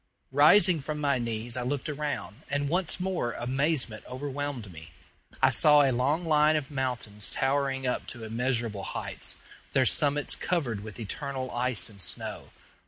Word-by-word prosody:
Rising 160 +4 +6
from 150 +2 -4
my 140 -3 +1
knees 115 0 -3
I 125 - -2
looked 130 +2 -2
around, 145 - -4
and 145 +1 0
once 180 +2 0
more 180 -10 -1
amazement 130 -2 -1
overwhelmed 135 -4 -4
me. 80 +1 -11 0.5
I - - +7
saw 150 -1 +6
a 135 - +3
long 140 +8 +1
line 155 -1 +4
of 150 -1 -2
mountains 125 -6 -3
towering 135 -1 0
up 125 - -1
to 120 -2 -7
immeasurable 115 -2 -1
heights, - - -5 0.4
their - - +4
summits 145 0 +2
covered 135 - -1
with 105 +2 -9
eternal 130 +3 -2
ice 125 -1 +1
and 100 -3 -11
snow. - - -5
135 Hz, 155 wpm, -28 LUFS, 120-145 Hz, 0.5 s, I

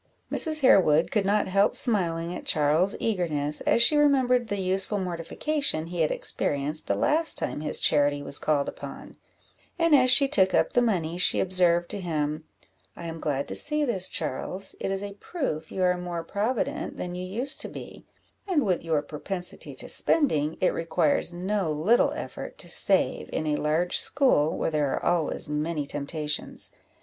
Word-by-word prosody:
Mrs. 310 -2 +3
Harewood 170 - +4
could 200 -3 0
not 205 +1 +1
help 195 +2 +2
smiling 175 -7 0
at - - -7
Charles's 155 +6 +2
eagerness, 155 -9 -2
as 235 - +4
she 300 - +4
remembered 260 -5 +2
the 205 - -3
useful 190 +2 +1
mortification 180 - -2
he 170 0 -4
had 155 - +2
experienced 145 +2 -2
the 100 - 0
last 315 - +1
time - - -2
his 150 - -1
charity 145 -1 +2
was 140 - -1
called 145 -2 0
upon; - - -9 0.6
and 335 -2 +2
as 255 -3 +5
she 275 +2 +7
took 190 -7 +3
up - - +1
the 245 - +3
money, 175 -7 -1
she - - +4
observed 175 -2 +2
to 205 - -4
him 155 -2 -3 0.5
"I 170 - -9
am 165 0 -6
glad 140 -3 -2
to - - -4
see 300 0 +3
this, 190 -8 0
Charles; 185 +8 -3
it - - -3
is 195 +1 -2
a 200 0 -7
proof 200 - -5
you 190 - -2
are 180 0 +2
more 175 -2 -5
provident 210 +7 -3
than 175 0 -5
you 180 0 -6
used 235 +10 -1
to - - -3
be; - - -11 0.4
and, 335 -7 +1
with 185 -3 -1
your 160 -3 -1
propensity 180 +4 -2
to - - -8
spending, 155 - +3
it 185 - +1
requires 165 -1 0
no 185 0 -2
little 170 +11 +2
effort - - -8
to - - -6
save, - - +3
in 155 - -3
a 150 -1 0
large 160 +4 0
school, 255 - +2
where - - -2
there 150 -3 0
are - - -6
always 165 -4 0
many 150 0 -3
temptations. 150 +1 -4
180 Hz, 180 wpm, -25 LUFS, 155-210 Hz, 0.6 s, she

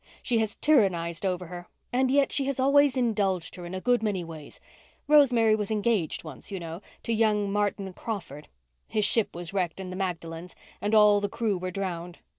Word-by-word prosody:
She 235 -3 +1
has 220 -1 -1
tyrannized 190 - +2
over 180 -1 -2
her, 175 0 -9 0.3
and 260 +1 +2
yet 275 +1 +3
she 275 - 0
has 275 -1 -2
always 280 0 +4
indulged 200 -8 0
her 175 -1 -8
in 180 - -6
a - - -3
good 245 +4 +2
many 205 -5 -1
ways. 160 -3 -10 0.5
Rosemary 245 -7 +5
was 210 -2 -3
engaged 210 -5 0
once, 155 -5 -8
you 195 - -3
know—to 170 +7 -6
young 210 -2 +2
Martin 200 -2 -1
Crawford. 170 - -6 0.4
His 215 -1 0
ship 225 -6 +1
was 175 +1 -7
wrecked 180 -3 -1
on 185 -1 -6
the - - -5
Magdalens 170 -2 -5 0.3
and 210 +2 +1
all 210 -1 +6
the 205 - -1
crew 220 -1 -1
were 185 0 -4
drowned. 180 -2 -4
200 Hz, 190 wpm, -27 LUFS, 175-225 Hz, 0.5 s, all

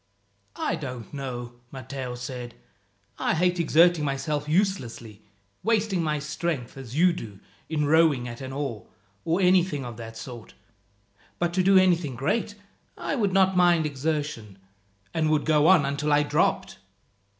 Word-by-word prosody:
"I - - -1
don't 125 -5 -7
know," 120 -3 -6
Matteo 130 -1 -6
said. 125 -1 -7 0.6
"I - - +1
hate 180 +1 +1
exerting 170 0 +4
myself 145 +1 -2
uselessly 125 - -1 0.4
wasting 215 -5 +1
my 155 -2 0
strength, 150 -3 -3
as 130 -2 -9
you 180 +1 +5
do, 105 - -8 0.3
in 150 -2 0
rowing 150 -5 +3
at 120 +2 -8
an 130 0 -6
oar, 135 -7 -4 0.4
or 170 +3 +1
anything 180 -6 +3
of 120 -2 -7
that 115 -1 -9
sort; 120 0 -9 0.8
but 170 0 -1
to 185 - +2
do 195 +1 +5
anything 175 -7 +3
great, 205 - -1 0.4
I - - -3
would 215 -8 +1
not 190 0 +3
mind 175 -3 +4
exertion, 145 -8 -3 0.6
and 155 -1 +1
would 155 -1 +1
go 155 -1 +4
on 180 -6 +6
until 140 +2 -1
I 145 0 +4
dropped." 145 - 0
150 Hz, 150 wpm, -26 LUFS, 125-175 Hz, 0.8 s, on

